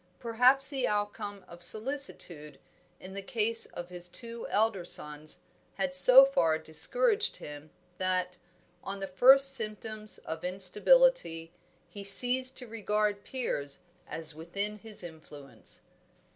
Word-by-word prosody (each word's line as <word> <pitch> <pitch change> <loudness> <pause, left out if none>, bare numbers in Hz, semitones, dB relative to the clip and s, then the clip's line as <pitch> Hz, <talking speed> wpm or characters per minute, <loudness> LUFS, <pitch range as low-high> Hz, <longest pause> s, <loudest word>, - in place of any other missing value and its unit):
Perhaps 250 +4 +1
the 265 -3 -2
outcome 205 -1 -6
of 170 0 -16
solicitude 200 - +2 0.4
in 190 +1 -13
the 200 - -8
case 225 +2 +1
of 175 0 -11
his 180 0 -10
two 235 +4 -8
elder 210 -3 -2
sons 155 -3 -3 0.3
had 275 -1 -3
so 270 -1 +8
far 165 - -1
discouraged 435 - +2
him, 150 +1 -12 0.3
that, 185 -1 -4 0.5
on 195 0 -8
the 195 - -6
first 265 +8 +4
symptoms 215 -2 -4
of 160 0 -10
instability, 190 - +2 0.4
he 200 - -12
ceased 250 +6 +4
to 250 - -10
regard 210 -2 -4
Piers 145 - -4 0.2
as 160 -1 -3
within 200 +7 -7
his 215 -3 -5
influence. 155 -4 -10
205 Hz, 125 wpm, -27 LUFS, 175-250 Hz, 0.5 s, so